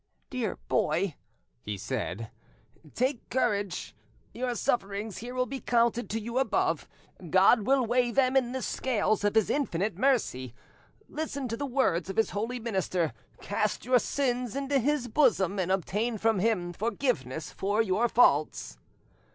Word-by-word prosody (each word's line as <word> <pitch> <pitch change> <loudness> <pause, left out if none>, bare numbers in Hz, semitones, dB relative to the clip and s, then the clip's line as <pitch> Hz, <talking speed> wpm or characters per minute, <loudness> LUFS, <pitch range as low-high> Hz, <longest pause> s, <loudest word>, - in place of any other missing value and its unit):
"Dear 245 -6 -2
boy," 170 +3 +1 0.5
he 105 -1 -5
said, 110 -1 -4 0.6
"take 255 0 -1
courage; 200 -7 -1 0.4
your 245 0 -2
sufferings 205 -2 -1
here 245 +2 -7
will 255 0 +1
be 265 +2 -5
counted 235 0 +1
to 225 - -1
you 235 +3 -2
above: 265 - 0 0.4
God 195 +5 +5
will 265 -2 +4
weigh 245 +1 +2
ahem 260 0 +2
in 250 -2 +3
the 260 0 -3
scales 215 -5 0
of 205 +1 +1
His 220 -2 +3
infinite 200 - -1
mercy. 130 - +1 0.5
Listen 285 -4 -4
to 230 - -2
the 285 +4 -3
words 240 - +1
of 195 - -5
His 225 - +2
holy 230 +5 -3
minister, 185 - -1 0.3
cast 210 +2 -1
your 250 0 +4
sins 250 -3 -1
into 275 0 +1
His 275 0 0
bosom, 200 - +2
and 185 0 0
obtain 210 +5 0
from 220 -1 +2
Him 180 -4 0
forgiveness 215 - -2
for 205 +2 -1
your 220 +4 +1
faults." 150 - +2
225 Hz, 150 wpm, -29 LUFS, 190-255 Hz, 0.6 s, God